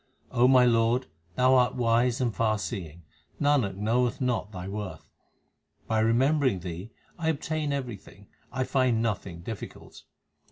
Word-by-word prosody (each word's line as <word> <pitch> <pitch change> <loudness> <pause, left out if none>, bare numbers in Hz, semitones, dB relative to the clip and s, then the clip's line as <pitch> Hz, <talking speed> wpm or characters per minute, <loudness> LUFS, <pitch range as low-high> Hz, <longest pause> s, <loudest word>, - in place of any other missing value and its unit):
my 125 +1 +6
Lord, 115 +1 +3 0.3
Thou 130 +1 +4
art 125 -1 +3
wise 120 0 +2
and 120 -3 0
far 110 0 +1
seeing; 85 -6 -6 0.4
Nanak 140 -10 +2
knoweth 115 +4 0
not 125 -5 -1
Thy 90 -3 -7
worth. 95 -5 -6 0.8
By 110 -1 0
remembering 125 - +2
Thee, 90 +4 -6 0.3
I 160 -1 0
obtain 155 -1 -2
everything, 120 -7 -6 0.3
I 130 +1 -1
find 125 -3 +1
nothing 100 -6 -3
difficult. 105 +4 -8
115 Hz, 130 wpm, -27 LUFS, 105-130 Hz, 0.8 s, my